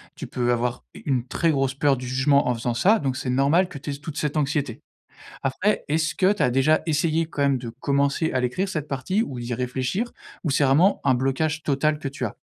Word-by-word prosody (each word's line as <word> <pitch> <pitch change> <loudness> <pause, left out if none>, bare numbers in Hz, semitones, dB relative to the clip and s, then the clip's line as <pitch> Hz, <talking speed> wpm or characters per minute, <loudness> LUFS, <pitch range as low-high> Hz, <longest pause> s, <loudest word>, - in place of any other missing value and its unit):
Tu - - -7
peux 120 -1 0
avoir 120 0 -1
u - - -11
une 130 -4 0
très 165 +5 +1
grosse 135 -2 0
peur 140 0 +2
du 125 0 -6
jugement 135 +3 +2
en 125 - +2
faisant 120 +1 -2
ça, 200 - +3
donc 135 -3 -1
c'est 130 - -4
normal 140 +8 +3
que 165 - -8
tu 140 - -7
aies - - -3
toute 150 +2 -8
cette 150 0 -1
anxiété. 145 -4 -1 0.6
Après, 185 +11 0
est-ce 155 +1 0
que 190 +2 +3
tu 210 - -1
as 125 - +3
déjà 135 +5 +3
essayé 160 +1 +1
quand 155 -3 -4
même 140 -1 +3
de 120 -2 -6
commencer 140 +3 +1
à 130 - +1
l'écrire, 125 +11 -1
cette 155 -5 -3
partie, 185 - -1
ou 130 - -6
d'y 120 0 -4
réfléchir? 130 - -2 0.3
Ou 155 - -1
c'est 135 - +2
vraiment 165 +9 +4
un 135 - +4
blocage 150 +5 -1
total 150 +2 +1
que 145 - -4
tu 135 -2 -4
as? 105 - -5
140 Hz, 235 wpm, -24 LUFS, 130-155 Hz, 0.6 s, vraiment